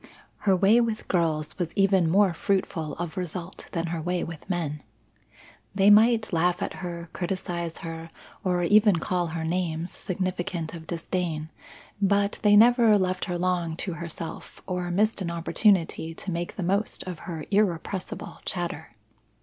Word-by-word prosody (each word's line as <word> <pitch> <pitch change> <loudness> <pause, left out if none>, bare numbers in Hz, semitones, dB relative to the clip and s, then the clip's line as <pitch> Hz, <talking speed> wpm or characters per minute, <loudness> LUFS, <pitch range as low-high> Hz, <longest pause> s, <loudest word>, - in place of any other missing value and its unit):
Her 190 - +6
way 205 +6 +5
with 225 -2 -2
girls 160 -3 0
was 170 -2 -2
even 195 -4 +4
more 195 +1 +4
fruitful 170 -4 -1
of 175 0 -5
result 180 0 -5
than 165 -2 -1
her 165 - -2
way 175 +2 -1
with 165 +2 -8
men. 155 -5 -2 0.9
They 195 +1 +6
might 220 0 +5
laugh 175 +2 +2
at - - -3
her, 170 -2 -6
criticize 175 -2 -3
her 165 0 -6 0.3
or 180 -1 +1
even 210 +2 +5
call 175 +1 -1
her 160 0 -4
names 165 0 -1
significant 180 -3 -3
of 160 -2 -9
disdain, 165 -2 -3 0.5
but 200 +1 +2
they 205 -1 +5
never 230 -1 +6
left 185 -1 0
her 180 -2 -2
long 175 -2 0
to 185 - -3
herself 170 -1 -7
or 180 -1 -2
missed 205 +4 +1
an 175 - -2
opportunity 170 -1 +1
to 190 - -5
make 170 0 -3
the 190 - -3
most 200 +4 0
of 180 -3 -6
her 160 -3 -5
irrepressible 195 -2 -1
chatter. 170 -6 -4
180 Hz, 155 wpm, -26 LUFS, 165-195 Hz, 0.9 s, Her